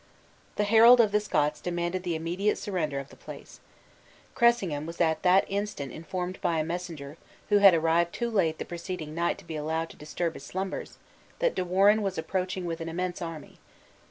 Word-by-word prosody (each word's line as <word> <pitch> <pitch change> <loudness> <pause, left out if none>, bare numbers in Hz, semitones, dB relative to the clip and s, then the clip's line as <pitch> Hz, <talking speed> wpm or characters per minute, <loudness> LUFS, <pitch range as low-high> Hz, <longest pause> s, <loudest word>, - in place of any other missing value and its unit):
The 210 - +1
herald 230 +4 +7
of 220 -3 +5
the 210 - +3
Scots 150 -7 0
demanded 175 +1 -2
the 175 -2 -2
immediate 175 +6 -1
surrender 160 -8 -2
of 140 0 -6
the - - -15
place. - - -11 0.7
Cressingham 190 - +2
was 170 +1 -8
at 160 -2 +2
that 185 +1 +4
instant 200 -9 -3
informed 180 +4 -5
by 165 - +1
a 155 - +1
messenger, 165 -3 -6 0.3
who 205 -1 +5
had 195 -3 +8
arrived 165 +1 +2
too 235 +4 -3
late 165 -7 +1
the - - -5
preceding 170 -3 -6
night 170 +1 0
to - - -15
be 160 - -6
allowed 160 +2 -2
to - - -16
disturb 160 +2 -3
his 135 - -10
slumbers, 190 +5 -5 0.4
that - - +1
De - - -1
Warenne 195 +4 +4
was 195 -2 -2
approaching 185 +2 -2
with 165 -1 -4
an 165 - -4
immense 180 +2 -3
army. 165 -3 -7
175 Hz, 190 wpm, -28 LUFS, 160-195 Hz, 0.7 s, had